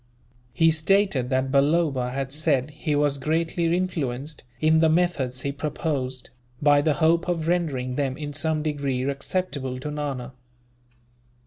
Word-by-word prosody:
He 165 -1 +4
stated 160 -5 +2
that 130 0 0
Balloba 140 -2 +2
had 135 +1 -3
said 150 -2 0
he 150 0 -2
was 145 -1 +1
greatly 165 +4 0
influenced, 150 -6 -3 0.2
in 160 +1 +4
the 160 0 +4
methods 155 -7 +1
he 140 - -1
proposed, 140 -3 -3 0.3
by 145 -1 +5
the 150 0 +1
hope 165 +4 +2
of 165 -2 -1
rendering 145 -8 0
them 135 -2 -1
in 145 -2 -5
some 155 0 0
degree 140 -4 -1
acceptable 140 -1 -2
to 150 +3 -5
Nana. 135 -4 -4
145 Hz, 140 wpm, -25 LUFS, 135-160 Hz, 0.3 s, by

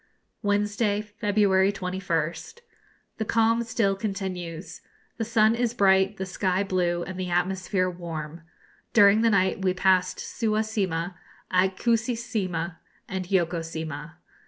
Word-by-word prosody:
Wednesday, 205 0 +1
February 205 -2 +2
21st. 180 - -3 0.6
The 220 - -1
calm 230 +1 +3
still 225 -4 +1
continues. 190 -4 -5 0.4
The 230 - -1
sun 220 -1 +3
is 240 0 -1
bright, 195 -1 +3
the 190 - -3
sky 185 0 0
blue, 175 -3 0
and 185 0 -7
the 185 -1 -3
atmosphere 185 +1 0
warm. 165 -3 -6 0.5
During 205 -1 +6
the 230 - +4
night 195 -2 +2
we 185 -1 +1
passed 185 0 +2
Suwa 215 -2 -1
Sima, 185 -5 -2 0.4
Akuisi 220 +6 +2
Sima, 185 -8 -3 0.3
and 190 -2 -4
Yoko 175 -3 +1
Sima. 160 -1 -6
190 Hz, 125 wpm, -26 LUFS, 180-215 Hz, 0.6 s, During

